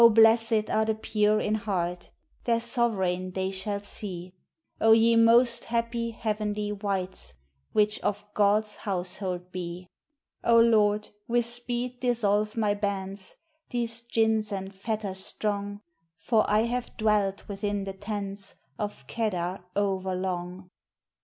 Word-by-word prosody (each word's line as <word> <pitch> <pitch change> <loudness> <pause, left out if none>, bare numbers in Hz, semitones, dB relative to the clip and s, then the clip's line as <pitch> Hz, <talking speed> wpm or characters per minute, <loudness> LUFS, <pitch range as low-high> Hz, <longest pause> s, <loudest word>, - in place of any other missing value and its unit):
blessèd 225 0 +5
are 220 0 +2
the 220 0 +1
pure 215 -1 +2
in 210 - 0
heart 180 -5 -2 0.4
Their 230 -1 +3
sovereign 200 -7 0
they 190 0 -1
shall 200 +1 -3
see; 185 -3 -5 0.5
O 220 0 +6
ye 230 +1 +5
most 235 +1 +5
happy, 230 0 -1
heavenly 210 -2 -2
wights, 190 - -2 0.4
Which 210 0 +2
of 205 0 -2
God's 210 +1 +2
household 180 -1 -3
be! 180 0 -6 0.5
O 230 0 +6
Lord, 210 -2 +4 0.2
with 240 0 +2
speed 240 +1 -4
dissolve 215 -4 +1
my 210 -2 +2
bands, 195 -2 -3 0.3
These 235 -1 -2
gins 220 -2 +1
and 195 0 -4
fetters 195 -1 -3
strong; 205 0 -2 0.4
For 215 +6 +2
I 210 +1 +4
have 240 +1 -2
dwelt 210 -3 +1
within 205 0 -2
the 195 0 -5
tents 200 0 -5 0.2
Of 205 -1 -4
Kedar 185 -5 -2
over 190 -2 0
long. 180 0 -4
210 Hz, 125 wpm, -28 LUFS, 190-225 Hz, 0.5 s, O